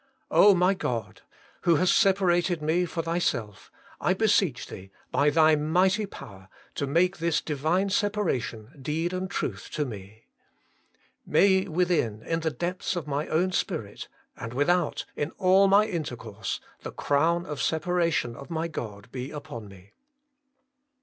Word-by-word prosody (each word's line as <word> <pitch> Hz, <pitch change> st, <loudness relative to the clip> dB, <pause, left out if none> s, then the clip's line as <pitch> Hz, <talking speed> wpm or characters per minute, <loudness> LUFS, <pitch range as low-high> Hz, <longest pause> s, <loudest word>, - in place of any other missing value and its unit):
my 190 Hz, -2 st, +6 dB
God! 120 Hz, -, -4 dB, 0.4 s
who 170 Hz, -, +4 dB
hast 180 Hz, +4 st, +3 dB
separated 180 Hz, -4 st, +3 dB
me 160 Hz, +4 st, +1 dB
for 165 Hz, -1 st, -3 dB
Thyself, 140 Hz, -, -2 dB, 0.3 s
I 180 Hz, -, +1 dB
beseech 195 Hz, -, +2 dB
Thee, 95 Hz, 0 st, -10 dB, 0.2 s
by 145 Hz, +1 st, +3 dB
Thy 155 Hz, +1 st, +5 dB
mighty 185 Hz, +7 st, +2 dB
power, 95 Hz, -, -12 dB, 0.2 s
to 140 Hz, -, -2 dB
make 175 Hz, +6 st, +2 dB
this 170 Hz, -1 st, +1 dB
Divine 160 Hz, +7 st, 0 dB
separation 180 Hz, -, -1 dB
deed 160 Hz, +6 st, -2 dB
and 185 Hz, 0 st, -3 dB
truth -, -, -4 dB
to 150 Hz, -, 0 dB
me. 105 Hz, -2 st, -10 dB, 1.0 s
May 190 Hz, 0 st, +3 dB
within, 160 Hz, -, 0 dB
in 165 Hz, 0 st, -1 dB
the 160 Hz, -1 st, 0 dB
depths 175 Hz, +7 st, -3 dB
of 175 Hz, -, -3 dB
my 145 Hz, +1 st, -2 dB
own 180 Hz, +4 st, +1 dB
spirit, -, -, -3 dB, 0.3 s
and 115 Hz, +1 st, -7 dB
with 145 Hz, +6 st, +3 dB
out, 175 Hz, -4 st, 0 dB
in 145 Hz, -, -2 dB
all 190 Hz, +1 st, +5 dB
my 200 Hz, +2 st, +5 dB
intercourse, 120 Hz, -, -4 dB, 0.2 s
the -, -, -7 dB
crown 165 Hz, +5 st, +1 dB
of 150 Hz, -5 st, -5 dB
separation 165 Hz, -6 st, 0 dB
of 140 Hz, +5 st, -11 dB
my 165 Hz, 0 st, -2 dB
God 105 Hz, -10 st, -7 dB
be 130 Hz, +1 st, -5 dB
upon 145 Hz, -8 st, -8 dB
me. 95 Hz, 0 st, -16 dB
165 Hz, 145 wpm, -27 LUFS, 135-180 Hz, 1.0 s, my